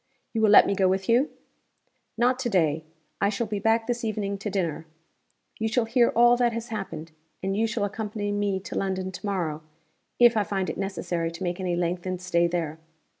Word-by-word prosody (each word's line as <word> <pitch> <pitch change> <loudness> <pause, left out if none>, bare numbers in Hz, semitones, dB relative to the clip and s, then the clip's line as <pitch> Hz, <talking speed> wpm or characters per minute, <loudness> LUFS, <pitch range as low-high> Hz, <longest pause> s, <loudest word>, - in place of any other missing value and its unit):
"You 225 - 0
will 215 - +5
let 205 - +8
me 200 - +1
go 190 -1 +2
with 190 +1 0
you?" 245 +5 +3 0.9
"Not 250 +2 +2
to 250 - -1
day. 160 -6 +1 0.4
I 200 - +3
shall 215 +3 -1
be 210 -1 -3
back 225 +2 +2
this 240 0 -2
evening 205 -2 -2
to 210 - -3
dinner. 170 -5 -2 0.7
You 220 - 0
shall 225 +1 +1
hear 235 +1 +3
all 240 +1 +6
that 240 -1 +2
has 230 0 -5
happened; 165 -7 -5 0.3
and 195 +1 -1
you 225 +2 +2
shall 215 -2 -1
accompany 205 0 -3
me 205 -2 0
to - - -8
London 190 -1 -2
to 190 - -9
morrow 165 -6 -2 0.6
if 240 -1 +6
I 215 - +3
find 195 -2 -2
it - - -8
necessary 180 -4 -2
to 170 +3 -7
make 175 +1 -2
any 180 -2 -1
lengthened 175 +1 -2
stay 170 -1 +2
there. 165 -2 -3
200 Hz, 205 wpm, -26 LUFS, 180-225 Hz, 0.9 s, let